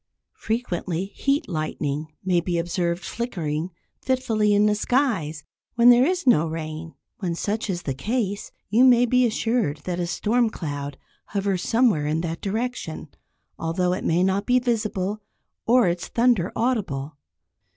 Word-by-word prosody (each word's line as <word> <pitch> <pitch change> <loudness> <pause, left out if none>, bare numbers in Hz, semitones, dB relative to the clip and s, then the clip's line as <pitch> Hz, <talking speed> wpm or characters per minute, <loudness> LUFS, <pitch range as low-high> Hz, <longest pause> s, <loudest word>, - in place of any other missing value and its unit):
Frequently 185 -6 -2
"heat 280 +3 0
lightning" 155 -3 -3 0.2
may 180 -2 +3
be 175 0 -1
observed 175 +1 -1
flickering 170 -8 -3 0.3
fitfully 240 -5 +1
in 205 0 +4
the 210 - +4
skies, 210 - 0 0.3
when 240 +1 +7
there 245 +3 +5
is 360 -2 -1
no 165 - +4
rain. 160 0 -6 0.2
When 175 -5 -2
such 215 +5 -2
is 175 -2 -2
the 135 - -2
case, 205 - -2 0.2
you 230 +4 +5
may 245 -2 +6
be 250 +1 +3
assured 225 -9 0
that 180 -1 -3
a 175 - -1
storm 225 +6 +1
cloud 145 -7 -5 0.3
hovers 195 -3 -1
somewhere 220 -10 +2
in 155 +2 0
that 165 -1 -4
direction, 210 - -3 0.5
although 180 +2 0
it 185 - -3
may 170 +2 +2
not 190 +2 0
be 250 0 +4
visible, 215 -4 -1 0.5
or 245 -3 +5
its 175 0 -1
thunder 230 -7 +2
audible. 160 - -1
195 Hz, 150 wpm, -24 LUFS, 165-235 Hz, 0.5 s, when